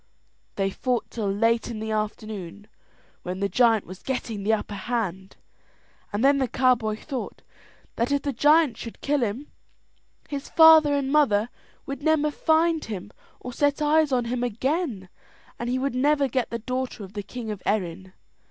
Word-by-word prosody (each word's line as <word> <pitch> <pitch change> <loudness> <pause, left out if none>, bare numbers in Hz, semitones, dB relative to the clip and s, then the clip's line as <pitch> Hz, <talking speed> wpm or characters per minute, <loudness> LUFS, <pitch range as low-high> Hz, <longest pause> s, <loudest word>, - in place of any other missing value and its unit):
They 195 -1 0
fought 250 +3 -2
till 210 -4 -2
late 230 +4 +1
in 230 - -5
the 220 0 -4
afternoon, 210 -3 -4 0.6
when 180 +1 -5
the 200 - +1
giant 225 -1 +3
was 185 +1 -10
getting 235 -5 -4
the 205 +3 +1
upper 215 -1 -2
hand; 195 -3 -3 0.8
and 210 +5 0
then 280 0 +5
the 260 - +1
cowboy 240 -4 +2
thought 265 +1 -6 0.5
that 235 +4 0
if 285 -1 +1
the 280 - -2
giant 295 -1 +4
should 230 - -9
kill 290 -1 +1
him, 240 +6 -3 0.8
his 285 -1 -5
father 320 -3 +7
and 275 -1 -1
mother 235 -7 +3 0.4
would 275 0 -6
never 300 0 +2
find 320 +1 +2
him 205 -2 -6 0.3
or 250 - -7
set 285 +3 +1
eyes 305 0 +3
on 245 -2 +1
him 245 +1 -2
again, 245 - -2 0.5
and 240 - -3
he 255 - 0
would 275 0 -1
never 285 +2 +2
get 255 -1 -1
the 235 - -3
daughter 255 -1 -4
of 190 0 -11
the 205 - -4
king 225 +2 -6
of 205 -3 -6
Erin. 190 -2 -2
240 Hz, 170 wpm, -25 LUFS, 210-280 Hz, 0.8 s, father